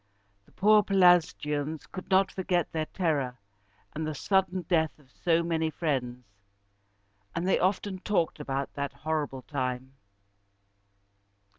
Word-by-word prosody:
The - - -23
poor 210 +2 +5
Pelasgians 165 -6 +2
could 185 - -9
not 190 0 +4
forget 180 -3 -1
their 155 -1 -2
terror 145 -9 -1 0.6
and 155 - -3
the 155 - -3
sudden 190 +2 +1
death 160 -2 +1
of 135 -4 -24
so 170 +3 +1
many 160 -1 0
friends, 130 -6 -2 1.1
and 170 +2 -1
they 190 - +3
often 190 0 0
talked 180 -6 0
about 135 -1 -3
that 140 0 -3
horrible 150 -4 -3
time. 130 -2 -3
160 Hz, 125 wpm, -28 LUFS, 140-185 Hz, 1.1 s, poor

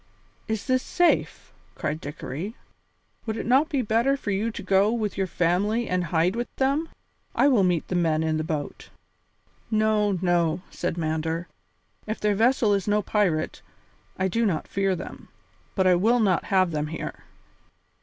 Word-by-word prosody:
"Is 220 -2 -2
this 255 -1 +2
safe?" 350 +5 0 0.2
cried 155 +2 -3
Dickory; 150 - -6 0.7
"would 220 0 -2
it - - -4
not 270 +6 +3
be 280 -6 0
better 235 +6 +2
for 205 - -4
you 205 +4 0
to 225 - -7
go 195 +2 +3
with 220 -3 -2
your 190 -1 -1
family 185 +7 +1
and 180 -1 0
hide 170 +4 +1
with 240 +1 -2
them? 280 +5 0 0.5
I - - +4
will 245 -8 +4
meet 175 -3 +1
the - - -4
men 160 -3 +1
in 160 -1 0
the 155 - -1
boat." 155 -3 -5 0.8
"No, 215 -2 +2
no," 175 -1 +1
said 175 -1 -3
Mander; 160 +1 -2 0.6
"if 215 - -3
their 210 0 +2
vessel 225 0 +3
is 200 -1 -1
no 210 0 +2
pirate, 185 -8 0 0.6
I 190 - +1
do 230 +5 0
not 185 -8 0
fear 195 -1 0
them. - - -9 0.5
But 190 - +2
I 185 - +6
will 220 +8 +3
not 195 -6 +2
have 185 -3 +2
them 150 -1 -2
here." 160 - -6
195 Hz, 170 wpm, -25 LUFS, 170-225 Hz, 0.8 s, I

